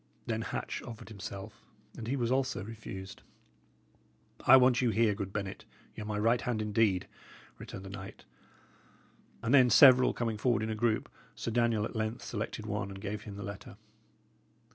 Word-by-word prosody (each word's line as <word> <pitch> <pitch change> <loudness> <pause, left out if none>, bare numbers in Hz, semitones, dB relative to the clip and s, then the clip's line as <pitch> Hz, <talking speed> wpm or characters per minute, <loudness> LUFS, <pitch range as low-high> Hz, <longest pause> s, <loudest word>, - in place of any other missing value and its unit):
Then 115 -1 -2
Hatch - - -4
offered 115 -2 -9
himself, 100 -2 -8 0.3
and 110 - -7
he 135 - 0
also 130 +2 0
was 100 - -8
refused. 100 -3 -8 1.3
"I 130 - +10
want 125 -1 +4
you 125 - +2
here, 110 0 +3
good 100 -2 -5
Bennet; 100 -2 -4 0.3
y' - - -7
are - - -5
my 105 0 -3
right 115 +3 +2
hand, 120 -3 -1
indeed," 105 -3 +1 0.5
returned 95 - -8
the - - -7
knight; 95 -1 -9 1.2
and 115 - +1
then 130 -3 +7
several 130 +2 +8
coming 115 -3 -2
forward 120 -2 +2
in 110 - -2
a - - -2
group, 110 0 0 0.3
Sir 115 - -4
Daniel 115 -2 +2
at - - -7
length 110 +1 -2
selected - - -4
one 95 - -3
and 95 0 -8
gave 105 +1 -5
him 105 -2 -7
the 100 - -7
letter. 100 +3 -8
110 Hz, 175 wpm, -31 LUFS, 100-120 Hz, 1.3 s, I